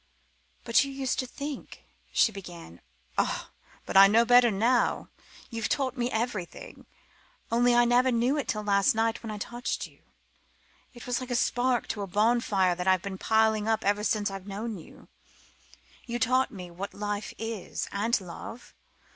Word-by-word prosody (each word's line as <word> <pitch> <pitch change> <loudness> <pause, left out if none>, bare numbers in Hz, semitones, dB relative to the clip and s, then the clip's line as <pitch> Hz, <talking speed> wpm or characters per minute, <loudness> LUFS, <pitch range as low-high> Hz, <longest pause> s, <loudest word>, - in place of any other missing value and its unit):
"But 235 +2 +4
you 275 - -5
used 270 -1 -2
to 255 - -2
think 280 +2 -7
..." - - -39
she 225 - +4
began. 175 - -10 0.4
"Ah - - -1 0.3
but - - -6
I 195 +1 +10
know 225 +3 +4
better 245 0 +6
now. 230 +4 +1 0.4
You've 225 -2 -2
taught 265 -2 0
me 245 -1 -1
everything. 225 - -4 0.6
Only 240 +1 +4
I 240 0 +5
never 250 +2 +3
knew 240 +4 +2
it 290 - -2
till 215 -1 -2
last 200 +4 +3
night 225 0 0
when 225 - -7
I 210 - -4
touched 240 +4 -4
you. - - -17 0.9
It 240 - -10
was 245 -1 -1
like 255 - -7
a 245 - -1
spark 245 0 +1
to 210 - -3
a 200 - -3
bonfire 205 -2 +2
that 180 +1 -4
I've 185 -2 +3
been 190 -1 -6
piling 220 -1 +2
up 220 -1 0
ever 205 +1 +1
since 210 -1 0
I've 195 0 -8
known 210 +1 -5
you. 160 - -15 1.0
You've 240 0 -3
taught 255 +3 +3
me 180 -7 -9
what 190 +4 -7
life 205 0 -4
is, 225 -3 -4
and 220 +4 +1
love. 190 +6 -10
225 Hz, 175 wpm, -28 LUFS, 200-245 Hz, 1.0 s, I